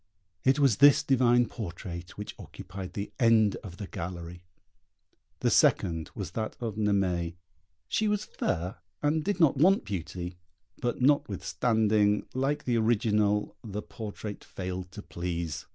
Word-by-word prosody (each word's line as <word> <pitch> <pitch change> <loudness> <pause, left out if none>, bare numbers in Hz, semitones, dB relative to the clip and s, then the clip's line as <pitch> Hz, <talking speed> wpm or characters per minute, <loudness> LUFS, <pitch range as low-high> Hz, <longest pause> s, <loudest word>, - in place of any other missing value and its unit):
It 135 +2 +4
was 135 -8 +4
this 145 +1 +7
divine 120 -3 +4
portrait 85 -5 -7
which 105 0 -6
occupied 95 -1 -8
the 100 +1 -4
end 115 -3 +4
of 90 -4 -10
the 105 - -5
gallery. 85 -1 -6 1.0
The - - +2
second 80 -2 +3
was - - -5
that 110 -1 -4
of 115 -3 -3
Naimée: 95 -5 0 0.5
she 215 - +1
was 210 0 0
fair, 90 +1 -2 0.3
and 150 +1 +2
did 205 +2 -1
not 155 -4 +4
want 185 +8 +4
beauty; 90 -1 -5 0.4
but 120 +1 -1
notwithstanding, 110 -4 +2
like 140 +3 0
the 120 -2 +1
original, 105 -2 +2
the 105 -2 -5
portrait 105 0 -7
failed 90 -1 -6
to 105 - -8
please. 85 -3 -4
105 Hz, 135 wpm, -29 LUFS, 90-120 Hz, 1.0 s, this